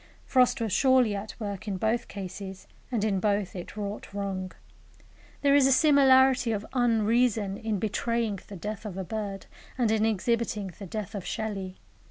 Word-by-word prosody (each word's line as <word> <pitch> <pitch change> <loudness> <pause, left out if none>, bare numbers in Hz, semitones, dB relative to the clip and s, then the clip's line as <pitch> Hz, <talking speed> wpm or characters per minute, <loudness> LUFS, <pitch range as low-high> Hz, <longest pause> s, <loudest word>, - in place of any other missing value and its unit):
Frost 255 -2 +3
was 225 -4 -1
surely 260 -2 +4
at 200 +4 -7
work 205 -2 -5
in 195 -2 -2
both 220 +4 0
cases, 190 0 -7 0.3
and 230 -4 0
in 200 -3 +1
both 205 -1 0
it 180 +3 -8
wrought 205 0 -5
wrong. 190 -2 -3 0.9
There 280 -1 +5
is 280 -2 +6
a - - +3
similarity 265 -3 +5
of 210 -1 -2
unreason 230 -3 +2
in 220 0 -2
betraying 220 +1 -1
the 200 - -9
death 210 +4 -5
of 200 -4 -6
a 190 - -2
bird 200 -1 -5 0.3
and 235 -4 +2
in 220 -1 +2
exhibiting 220 -2 0
the 200 - -7
death 210 +1 -5
of 200 -3 -4
Shelley. 195 -4 -4
215 Hz, 170 wpm, -28 LUFS, 200-235 Hz, 0.9 s, is